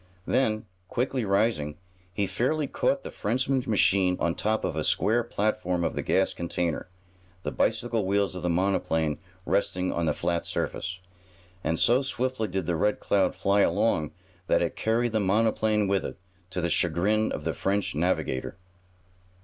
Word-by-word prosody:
Then, 110 -5 +1 0.2
quickly 125 +2 -1
rising, 95 -7 +1 0.3
he 100 +3 -1
fairly 145 +9 0
caught 270 - 0
the - - -7
Frenchman's 130 +4 0
machine 95 -3 +3
on 85 - +1
top 110 +4 0
of - - -2
a - - -1
square 120 +3 +2
platform 105 -6 -1
of - - 0
the - - -1
gas - - +1
container, 85 0 -2 0.5
the - - -2
bicycle 115 -1 0
wheels 100 +1 +1
of 90 - -6
the 90 - -1
monoplane 85 -4 +1 0.3
resting 90 -2 0
on 85 -1 -1
the - - +1
flat 85 0 -1
surface. 90 0 -3 0.6
And, 80 - 0
so 120 +3 +5
swiftly 130 -4 -1
did 95 -2 -2
the 85 - 0
Red 105 +6 +1
Cloud 100 -1 +1
fly 100 +1 +2
along 85 -5 +2 0.4
that - - +3
it - - -2
carried 115 +2 +1
the 110 - +1
monoplane 105 +1 +2
with 95 0 +1
it, - - -6 0.3
to 95 -1 -2
the 85 - 0
chagrin 100 +6 +2
of 75 - -4
the 80 +1 -1
French 100 +1 0
navigator. 75 -4 -1
100 Hz, 165 wpm, -27 LUFS, 90-110 Hz, 0.6 s, so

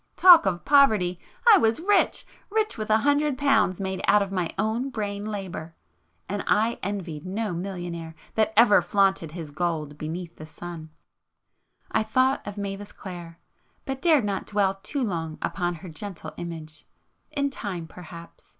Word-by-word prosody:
Talk 355 - +8
of 175 -2 -2
poverty! 215 -12 +4 0.3
I 400 - +7
was 225 -3 +2
rich!——rich 415 +3 0
with 215 -1 -5
a 215 - +5
hundred 290 -1 +2
pounds 275 -10 +2
made 190 -1 -3
out 205 0 +5
of 195 - -7
my 180 -4 -1
own 220 +6 0
brain 205 -4 -4
labour,—and 190 0 -7
I 225 +3 +2
envied 180 -6 -4
no 200 +1 -3
millionaire 170 -2 -5 0.2
that 220 0 +2
ever 220 -5 +7
flaunted 190 -3 +1
his 165 -4 -7
gold 155 -2 -3
beneath 165 +2 -6
the 155 - -9
sun! 165 -1 -8 1.0
I - - +2
thought 255 +5 +2
of 205 0 -6
Mavis 200 0 -5
Clare,... 175 -3 -9 0.5
but 270 -1 -4
dared 305 -8 +4
not 200 -2 -2
dwell 195 -2 +1
too 280 +6 -2
long 165 -7 -3
upon 175 -2 -2
her 180 +3 -10
gentle 180 +3 -8
image. 160 -3 -8 0.4
In 280 -2 -1
time 190 -10 -5
perhaps 170 0 -12
195 Hz, 150 wpm, -25 LUFS, 170-220 Hz, 1.0 s, Talk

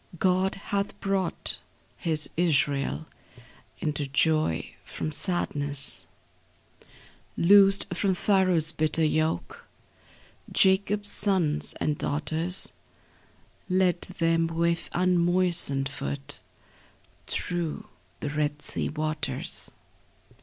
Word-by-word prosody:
God 185 +2 +1
hath 200 0 -3
brought 195 -2 -1 0.4
His 155 -2 0
Israel 150 -3 +1 0.7
Into 150 -2 -2
joy 140 - +1
from 155 - -5
sadness; 145 -5 0 1.3
Loosed 195 +2 +6
from 190 +2 +1
Pharaoh's 185 -4 +3
bitter 155 +1 +1
yoke 160 - -1 0.8
Jacob's 200 +2 +3
sons 180 -7 +2
and 150 -1 -1
daughters; 160 +5 0 1.0
Led 180 -1 +2
them 165 -2 +1
with 170 +1 -1
unmoistened 175 -5 +2
foot 140 0 -5 0.9
Through 175 -3 -3 0.4
the 145 - -3
Red 150 0 -2
Sea - - -2
waters. 155 0 -3
165 Hz, 80 wpm, -27 LUFS, 150-185 Hz, 1.3 s, Loosed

